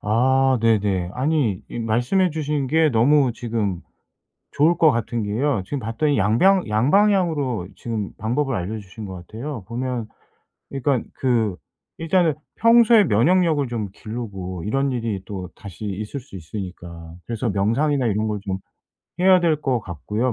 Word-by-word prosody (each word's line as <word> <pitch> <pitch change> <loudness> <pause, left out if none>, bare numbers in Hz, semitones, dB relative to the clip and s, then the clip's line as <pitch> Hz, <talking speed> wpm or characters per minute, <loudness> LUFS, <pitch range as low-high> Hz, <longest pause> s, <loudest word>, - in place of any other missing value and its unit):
아 130 +4 +2
네네. 100 -5 +1
아니 130 - 0
이 - - -6
말씀해 125 - +1
주신 150 -3 -2
게 160 +3 +3
너무 130 +2 +3
지금 110 -7 -2 0.7
좋을 160 +4 +3
것 160 -3 +5
같은 115 -1 -2
게요. 115 +3 0
지금 140 +4 -3
봤더니 125 +6 0
양뱡 120 - +3
양방향으로 145 - +2
지금 110 -4 -4
방법을 125 +4 -1
알려주신 100 +2 -6
거 95 - -7
같아요. 110 +6 -7
보면 120 -2 -3 0.6
그니깐 135 -2 0
그 115 -7 0 0.4
일단은 165 0 +2 0.2
평소에 230 -1 +6
면역력을 155 - +3
좀 110 -4 -3
기르고 95 -6 -6
이런 135 +5 0
일이 115 -6 -2
또 95 -3 -6
다시 100 +1 -9
있을 105 +7 -4
수 125 -6 -14
있으니까. 85 -2 -8
그래서 115 0 -2
명상이나 125 +8 +1
이런 110 +1 0
걸 105 -1 -2
좀 95 -1 -3 0.6
해야 185 -1 +6
될 160 -3 +1
거 130 -5 0
같고요 105 - -3
120 Hz, 295 characters per minute, -22 LUFS, 105-145 Hz, 0.7 s, 평소에